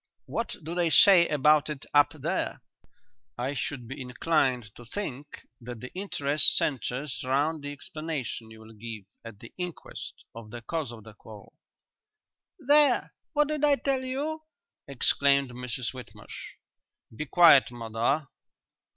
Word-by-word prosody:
"What 230 - -3
do 160 +3 -5
they 175 -1 +1
say 175 +1 +7
about 150 +1 +3
it 150 -3 -5
up 145 -1 +5
there?" - - -3 0.7
"I 130 +3 -2
should 125 -2 -4
be 135 +2 -7
inclined 125 -4 0
to 120 - -13
think 145 - -6 0.2
that 120 0 -8
the 130 - -9
interest 150 -6 +3
centres 130 +1 -2
round 145 +4 0
the 145 0 -6
explanation 150 -7 -5
you 110 0 -13
will 110 0 -14
give 110 -1 -8 0.2
at 115 -3 -11
the 115 - -13
inquest 180 -2 -7
of 115 -1 -10
the 120 +1 -9
cause 155 -2 -3
of 115 -2 -11
the 110 0 -13
quarrel." 105 0 -14 1.0
"There! 290 -4 +4 0.2
What 295 -1 +2
did 305 -1 -2
I 290 -1 +5
tell 275 -2 -1
you?" 290 +5 -3 0.5
exclaimed 140 0 +2
Mrs 125 0 -4
Whitmarsh. 125 -1 -10 0.6
"Be 155 - -5
quiet, 165 -6 +7
mother. 120 +5 -1
140 Hz, 140 wpm, -27 LUFS, 120-170 Hz, 1.0 s, say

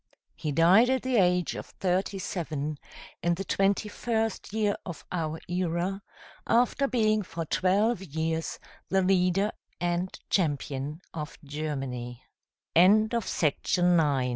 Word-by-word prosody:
He 150 - -3
died 180 - +5
at 260 -1 +1
the 255 -2 +1
age 180 -2 +3
of - - -7
thirty 190 +1 -1
seven, 155 -6 -3 0.4
in 175 0 +2
the 195 - -4
twenty 195 +2 +1
first 225 0 -2
year 210 -1 +1
of 170 -4 -8
our 160 -2 -2
era, 180 +2 -1 0.5
after 250 +4 +3
being 215 -4 +2
for 165 -3 -5
twelve 195 +6 +2
years 160 -1 -2 0.3
the 190 0 +2
leader 185 +2 +2 0.3
and 175 +1 0 0.2
champion 145 -3 -1
of 150 -2 -6
Germany. 135 -5 -4 0.5
TRAJAN 205 +6 +6
By 235 - +1 0.4
J. 160 -7 +3
S. - - -2
180 Hz, 130 wpm, -28 LUFS, 155-200 Hz, 0.5 s, TRAJAN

